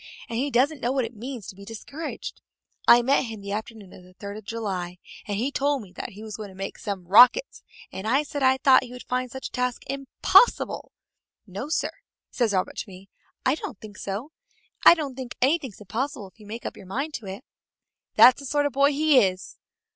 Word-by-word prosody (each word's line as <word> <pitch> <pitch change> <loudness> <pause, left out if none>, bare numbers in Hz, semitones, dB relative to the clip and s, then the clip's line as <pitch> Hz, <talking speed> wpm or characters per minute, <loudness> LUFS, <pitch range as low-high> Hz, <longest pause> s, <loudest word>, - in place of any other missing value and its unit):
And 230 0 -3
he 280 +3 0
doesn't 275 +3 +2
know 240 - 0
what 265 -2 +1
it 230 - -8
means 240 -1 -7
to - - -9
be 200 - -12
discouraged. 225 +9 -7 0.5
I 240 0 +8
met 270 +1 +3
him 225 -2 -7
the 200 0 -7
afternoon 215 -2 -6
of - - -13
the 180 0 -19
third 200 +1 -7
of 215 -1 -10
July 190 -6 -4 0.3
and 205 -1 -2
he 250 +6 -1
told 280 -2 0
me 190 - -15
that - - -7
he 210 +3 -10
was 215 -1 -7
going 210 -2 -7
to 190 - -14
make 195 +1 -6
some 195 -3 -5
rockets, 250 - +6 0.3
and 190 +3 -6
I 270 +6 +3
said 290 -1 -5
I 260 0 +4
thought 265 -1 +6
he 245 - -10
would 250 - -9
find 255 0 -1
such 265 +2 -6
a - - -40
task 250 -1 -2
impossible. 275 - +2 0.5
'No, 205 +8 -6
sir,' 335 - -2 0.3
says 235 -4 +1
Robert 185 -2 -1
to - - -5
me, 190 +1 -13 0.4
'I 260 - +4
don't 310 - -6
think 215 -2 -11
so. 205 +10 -5 0.5
I - - +10
don't 295 -5 -4
think 255 -1 -7
anything's 270 - +1
impossible 220 0 -4
if 185 - -34
you 210 - -14
make 225 +3 -7
up - - -4
your 195 - -13
mind 275 +10 -3
to - - -3
do 205 - -10
it.' 195 +9 -8 0.7
That's 255 +1 +8
the 280 - -7
sort 290 +2 +1
of 285 - -1
boy 280 +2 +4
he 300 -1 +5
is!" 185 -4 -1
240 Hz, 225 wpm, -25 LUFS, 200-275 Hz, 0.7 s, I